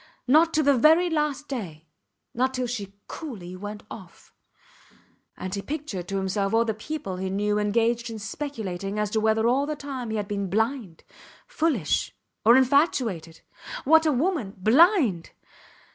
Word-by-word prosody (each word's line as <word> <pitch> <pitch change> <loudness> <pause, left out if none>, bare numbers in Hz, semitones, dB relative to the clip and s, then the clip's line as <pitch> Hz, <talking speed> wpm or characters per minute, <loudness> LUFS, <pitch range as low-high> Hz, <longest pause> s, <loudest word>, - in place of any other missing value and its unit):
Not 315 +5 +5
to 310 - +3
the 280 -1 +4
very 320 +7 +4
last 300 -2 -1
day... 175 - -6 0.5
not 260 +2 0
till 255 0 -1
she 205 -5 -5
coolly 200 - -8
went 205 +2 -7
off. 185 -6 -12 1.0
And 185 - -5
he 200 - -2
pictured 275 - -5
to 195 - -2
himself 195 +2 -1
all 230 +1 +3
the 220 - -1
people 215 -4 -5
he 190 +1 -3
knew 205 +2 0
engaged 230 +3 +1
in 225 - -6
speculating 210 -5 -5
as 210 -1 -1
to 220 - +1
whether 220 +1 +2
all 270 +4 +2
that 305 -1 -3
time 265 -5 -6
he 220 - -2
had 205 -1 -3
been 200 -2 -3
blind, 220 -3 -2 0.4
foolish, 285 - -1 0.3
or 235 +3 +7
infatuated. 250 - +1 0.4
What 320 +3 +5
a - - +4
woman! 275 - -1
Blind! 245 - +3
225 Hz, 160 wpm, -25 LUFS, 200-285 Hz, 1.0 s, or